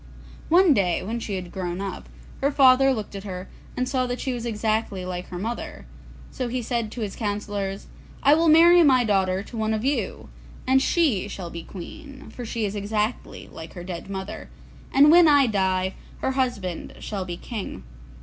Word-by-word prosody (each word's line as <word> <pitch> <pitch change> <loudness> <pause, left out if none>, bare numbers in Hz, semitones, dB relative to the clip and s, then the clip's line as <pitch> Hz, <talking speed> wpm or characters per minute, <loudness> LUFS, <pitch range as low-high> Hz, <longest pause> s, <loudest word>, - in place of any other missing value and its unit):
One 350 -1 +6
day 180 -7 +1
when 225 +5 -3
she 210 -3 -4
had 180 -2 -6
grown 180 -1 -4
up, 195 0 -6 0.3
her 280 +1 +2
father 270 -1 +6
looked 215 -6 -4
at 195 - -6
her, 185 -1 -6 0.3
and 255 - 0
saw 255 -1 0
that 245 0 -3
she 265 - -2
was 240 -1 -4
exactly 215 -3 -1
like 180 0 -5
her 180 - -7
mother, 240 - -5 0.5
so 255 - -3
he 245 +1 -3
said 230 -2 -2
to 240 - -6
his 205 -3 -4
councillors, 205 -2 -3 0.4
'I 285 +1 +7
will 325 +2 +3
marry 340 +3 +7
my 260 -6 +5
daughter 190 -3 +1
to 235 - -11
one 220 0 0
of 220 +3 -3
you, 255 - -2 0.4
and 265 +1 +4
she 270 - +2
shall 185 -4 -7
be 170 - -6
queen, 270 - -10
for 245 - -7
she 225 -1 -2
is 200 - -3
exactly 210 +2 -3
like 160 0 -9
her 175 - -8
dead 175 +1 -7
mother, 190 0 -6 0.4
and 290 +2 +7
when 345 0 +8
I 285 -2 +6
die 190 -3 0 0.3
her - - 0
husband 245 -10 -2
shall 200 -3 -4
be 175 -1 -6
king. 210 - -6
220 Hz, 190 wpm, -24 LUFS, 190-260 Hz, 0.5 s, when